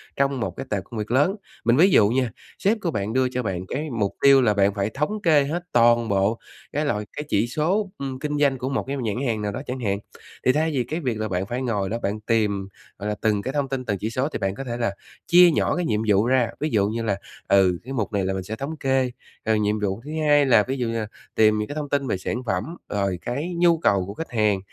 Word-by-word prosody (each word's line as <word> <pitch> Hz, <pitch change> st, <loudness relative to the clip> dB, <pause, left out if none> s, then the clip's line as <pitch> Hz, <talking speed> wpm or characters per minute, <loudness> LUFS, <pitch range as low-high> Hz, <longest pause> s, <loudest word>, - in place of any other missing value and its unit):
trong 140 Hz, -1 st, +1 dB
một 95 Hz, -6 st, -2 dB
cái 135 Hz, -, -5 dB
tệp 100 Hz, -3 st, -1 dB
công 115 Hz, -, -9 dB
việc 105 Hz, +2 st, -4 dB
lớn. 145 Hz, +10 st, +3 dB, 0.3 s
Mình 120 Hz, +2 st, +4 dB
ví 180 Hz, +6 st, +6 dB
dụ 105 Hz, -9 st, +6 dB
nha, 125 Hz, -1 st, +1 dB, 0.3 s
sếp 210 Hz, +4 st, +2 dB
của 170 Hz, -, -1 dB
bạn 105 Hz, -3 st, -2 dB
đưa 130 Hz, 0 st, +2 dB
cho 125 Hz, 0 st, -2 dB
bạn 95 Hz, -3 st, -3 dB
cái 150 Hz, +8 st, -3 dB
mục 110 Hz, -6 st, -1 dB
tiêu 140 Hz, -1 st, +7 dB
là 110 Hz, -4 st, +3 dB
bạn 100 Hz, 0 st, +3 dB
phải 100 Hz, 0 st, -1 dB
thống 150 Hz, -, -2 dB
kê 155 Hz, -4 st, +4 dB
hết 165 Hz, +5 st, -3 dB
toàn 120 Hz, -1 st, +4 dB
bộ 100 Hz, +3 st, +1 dB, 0.3 s
cái 150 Hz, +2 st, 0 dB
loại 105 Hz, -6 st, -1 dB
cái 150 Hz, -, -3 dB
chỉ 105 Hz, +4 st, +2 dB
số, 185 Hz, -, 0 dB
ừm, 135 Hz, -2 st, -5 dB
kinh 150 Hz, +1 st, -2 dB
doanh 140 Hz, -2 st, +3 dB
của 130 Hz, +1 st, -3 dB
một 135 Hz, -, -1 dB
cái 140 Hz, +1 st, -2 dB
nhãn 110 Hz, -5 st, -2 dB
hàng 110 Hz, -3 st, -1 dB
nào 105 Hz, -1 st, -2 dB
đó -, -, -5 dB
chẳng 130 Hz, +1 st, -4 dB
hạn. 100 Hz, -5 st, 0 dB, 0.5 s
Thì 130 Hz, -, +6 dB
thay 155 Hz, +4 st, +1 dB
vì 130 Hz, -4 st, 0 dB
cái 155 Hz, +7 st, -4 dB
việc 125 Hz, -8 st, -2 dB
là 110 Hz, -, -1 dB
bạn 95 Hz, -1 st, -2 dB
phải 120 Hz, +5 st, -3 dB
ngồi 105 Hz, -6 st, -1 dB
đó 115 Hz, -, -1 dB
bạn 100 Hz, +2 st, -1 dB
tìm, 105 Hz, -3 st, 0 dB, 0.3 s
gọi 105 Hz, +1 st, -3 dB
là, 105 Hz, -, -1 dB
từng 105 Hz, -2 st, +2 dB
cái 130 Hz, -, -4 dB
thông 145 Hz, -2 st, -1 dB
tin, 130 Hz, -1 st, -3 dB
từng 100 Hz, -2 st, -1 dB
chỉ 110 Hz, -, -2 dB
số 130 Hz, +5 st, -1 dB
thì -, -, -4 dB
bạn 95 Hz, 0 st, -1 dB
có 135 Hz, -, -5 dB
thể 120 Hz, -2 st, -4 dB
là 115 Hz, -5 st, -1 dB, 0.3 s
chia 175 Hz, 0 st, +7 dB
nhỏ -, -, +1 dB
cái 180 Hz, -2 st, -1 dB
nhiệm 105 Hz, -5 st, 0 dB
vụ 105 Hz, +1 st, +4 dB
ra. 130 Hz, -2 st, +3 dB
Ví 155 Hz, -, -1 dB
dụ 100 Hz, -6 st, +2 dB
như 115 Hz, +2 st, -2 dB
là, 100 Hz, -3 st, 0 dB, 0.3 s
ừ, 95 Hz, -2 st, +4 dB
cái 130 Hz, +3 st, -7 dB
mục 110 Hz, -4 st, -2 dB
này 100 Hz, -2 st, +1 dB
là 95 Hz, -, 0 dB
mình 95 Hz, -1 st, -3 dB
sẽ 105 Hz, +4 st, -5 dB
thống 140 Hz, +7 st, -5 dB
kê, 130 Hz, -2 st, +1 dB, 0.3 s
ừ, 110 Hz, -, +2 dB
nhiệm 105 Hz, 0 st, +1 dB
vụ 100 Hz, +1 st, -2 dB
thứ 150 Hz, -, -7 dB, 0.2 s
hai 145 Hz, -1 st, +5 dB
là 115 Hz, -5 st, +5 dB
ví 135 Hz, +1 st, -2 dB
dụ 125 Hz, -3 st, -1 dB
như 115 Hz, 0 st, -1 dB
là 110 Hz, -, -3 dB, 0.3 s
tìm 110 Hz, -1 st, +4 dB
những 105 Hz, 0 st, -2 dB
cái 145 Hz, -, -6 dB
thông 150 Hz, -2 st, -4 dB
tin 140 Hz, -1 st, 0 dB
về 105 Hz, -, 0 dB
sản 115 Hz, +7 st, -3 dB
phẩm, 95 Hz, -5 st, 0 dB, 0.3 s
rồi 100 Hz, -3 st, -1 dB
cái 145 Hz, +9 st, -3 dB
nhu 170 Hz, -1 st, +4 dB
cầu 100 Hz, -, +2 dB
của 100 Hz, -, -7 dB
khách 165 Hz, +9 st, -7 dB
hàng 105 Hz, -4 st, +2 dB
120 Hz, 280 wpm, -24 LUFS, 105-140 Hz, 0.5 s, tiêu